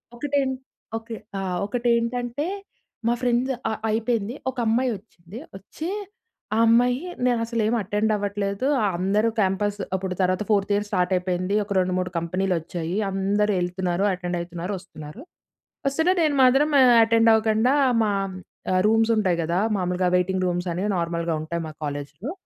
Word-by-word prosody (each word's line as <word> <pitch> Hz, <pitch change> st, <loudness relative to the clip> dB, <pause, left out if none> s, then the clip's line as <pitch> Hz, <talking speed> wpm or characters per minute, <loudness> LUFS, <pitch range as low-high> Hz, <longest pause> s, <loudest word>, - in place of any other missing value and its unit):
ఒకటేం 275 Hz, +1 st, 0 dB, 0.5 s
okay. 225 Hz, 0 st, -8 dB, 0.2 s
ఆహ్, 185 Hz, -2 st, -2 dB
ఒకటి 240 Hz, +3 st, -2 dB
ఏంటంటే 245 Hz, +4 st, -2 dB, 0.6 s
మా 235 Hz, -, +3 dB
ఫ్రెండ్స్ 250 Hz, +2 st, +1 dB, 0.2 s
అ -, -, -1 dB, 0.2 s
అయిపోయింది. 225 Hz, 0 st, 0 dB, 0.2 s
ఒక 260 Hz, -, -22 dB
అమ్మాయి 245 Hz, +3 st, +2 dB
వచ్చింది 190 Hz, -1 st, -14 dB, 0.2 s
వచ్చి, 310 Hz, -, -7 dB, 0.7 s
ఆ -, -, +1 dB
అమ్మాయి 245 Hz, +5 st, +3 dB, 0.2 s
నేను 245 Hz, -2 st, +2 dB
అసలు 230 Hz, 0 st, -2 dB
ఏమి 235 Hz, -, +1 dB
అటెండ్ 210 Hz, +2 st, 0 dB
అవ్వట్లేదు. 200 Hz, +2 st, -2 dB, 0.3 s
అందరూ 205 Hz, +5 st, +2 dB
క్యాంపస్ 205 Hz, +1 st, 0 dB, 0.2 s
అప్పుడు 185 Hz, -1 st, -3 dB
తర్వాత 185 Hz, +2 st, +1 dB
4త్ 200 Hz, 0 st, +2 dB
ఇయర్ 205 Hz, +1 st, -1 dB
స్టార్ట్ 185 Hz, -2 st, +1 dB
అయిపోయింది. 185 Hz, +2 st, -1 dB
ఒక 200 Hz, -, -4 dB
రెండు, 185 Hz, 0 st, 0 dB
మూడు 185 Hz, 0 st, -3 dB
కంపెనీలు 185 Hz, +3 st, -1 dB
వచ్చాయి, 170 Hz, +3 st, -4 dB
అందరూ 200 Hz, +2 st, +1 dB
ఎళ్తున్నారు, 180 Hz, +1 st, -1 dB
అటెండ్ 180 Hz, -1 st, -3 dB
అయితున్నారు, 175 Hz, +3 st, -5 dB
వస్తున్నారు. 175 Hz, -, -11 dB, 0.6 s
వస్తుం‌టే 320 Hz, +6 st, +2 dB
నేను 300 Hz, -2 st, +2 dB
మాత్రం 270 Hz, +4 st, +4 dB, 0.3 s
అటెండ్ 225 Hz, 0 st, +4 dB
అవ్వకుండా 220 Hz, +2 st, +3 dB, 0.3 s
మా 210 Hz, -, +1 dB, 0.8 s
రూమ్స్ 225 Hz, +1 st, +3 dB
ఉంటాయి 185 Hz, -5 st, +1 dB
కదా! 170 Hz, +3 st, 0 dB, 0.2 s
మాములుగా 180 Hz, 0 st, 0 dB
వెయిటింగ్ 185 Hz, +1 st, 0 dB
రూమ్స్ 175 Hz, +1 st, -2 dB
అనేవి 195 Hz, +5 st, -1 dB
నార్మల్‌గా 170 Hz, -1 st, -1 dB
ఉంటాయి. 170 Hz, +1 st, -3 dB
మా -, -, -10 dB
కాలేజ్‌లో. 145 Hz, -, -5 dB
200 Hz, 145 wpm, -24 LUFS, 180-230 Hz, 0.8 s, మాత్రం